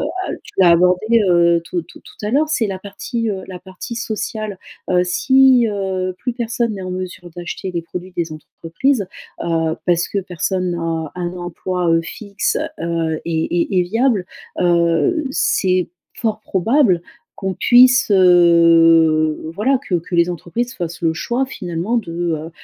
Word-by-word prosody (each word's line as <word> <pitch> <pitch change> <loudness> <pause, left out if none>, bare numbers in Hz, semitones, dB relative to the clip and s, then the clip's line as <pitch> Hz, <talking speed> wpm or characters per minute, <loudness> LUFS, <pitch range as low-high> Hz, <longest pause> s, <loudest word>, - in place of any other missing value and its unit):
a 375 0 -3 0.3
tu 190 - +4
as 175 - +6
abordé 180 +7 +3
heu, 170 -1 +4
tout 175 +1 -3
tout 165 - -16
tout 210 - -10
à - - -1
l'heure. 290 +6 +2
C'est 240 -7 +1
la 195 -2 -4
partie, 220 +3 -4
heu, 195 -2 -4
la 185 -1 -7
partie 190 +5 -9
sociale. 215 -3 -4 0.3
Heu, 180 -1 +3
si 260 +6 +4
heu, 190 -3 -2
plus 245 +5 -3
personne 235 -1 -2
n'est 195 - -7
en 185 - -5
mesure 180 -1 -6
d'acheter 175 +1 -6
des 170 - -2
produits 180 +2 -8
des 165 -2 -2
entreprises, 190 - -2 0.4
heu, 165 -1 0
parce 170 -1 +2
que 200 - -2
personne 180 0 -2
n'a 165 -2 -3
un 175 -1 -4
emploi, 175 0 -3
heu, 165 0 +3
fixe 200 +3 -3 0.2
heu, 165 -1 -1
et 160 -1 -1 0.2
et 190 0 -1
et - - +3
viable, 220 +1 0 0.3
heu, 170 - +2
c'est 185 -8 +1 0.3
fort 220 -2 -2
probable 210 - +2 0.4
qu'on 190 -1 -3
puisse, 250 +2 +5
heu, 165 -4 +5
voilà 255 +8 +1
que 185 - 0
que 170 +2 -6
les 170 0 +3
entreprises 205 +8 -4
fassent 170 -1 -5
le 160 -1 +1
choix 250 +9 -1
finalement 180 0 -3
de 190 -8 -3
heu 165 -2 -3
180 Hz, 165 wpm, -18 LUFS, 170-220 Hz, 0.4 s, as